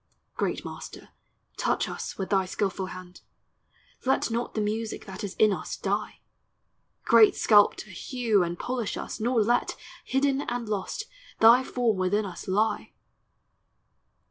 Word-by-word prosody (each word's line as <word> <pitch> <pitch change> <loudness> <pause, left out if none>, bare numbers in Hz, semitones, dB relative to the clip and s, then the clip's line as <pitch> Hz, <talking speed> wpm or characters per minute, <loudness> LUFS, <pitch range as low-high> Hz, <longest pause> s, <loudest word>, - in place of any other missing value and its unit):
Great - - -2
Master, - - -9 0.5
touch - - 0
us - - -6
with 190 0 -4
thy 190 -2 +2
skilful 190 0 -2
hand; 185 -1 -10 0.8
Let 265 -2 +1
not 235 +1 -2
the - - 0
music 215 +1 -2
that 190 -1 -8
is 200 - -5
in 215 -2 +4
us - - -5
die! - - -3 0.8
Great 230 -2 +6
Sculptor, 210 -1 +4
hew 225 +1 0
and 175 0 -2
polish 245 0 -3
us; - - -6
nor 230 0 +2
let, 240 +3 +1 0.3
Hidden 270 +1 +1
and 240 -1 -3
lost, 210 - -3 0.4
thy 235 +3 +7
form 240 -5 0
within 195 +3 +1
us 180 -3 -8
lie! 210 +4 0
215 Hz, 140 wpm, -27 LUFS, 195-240 Hz, 0.8 s, thy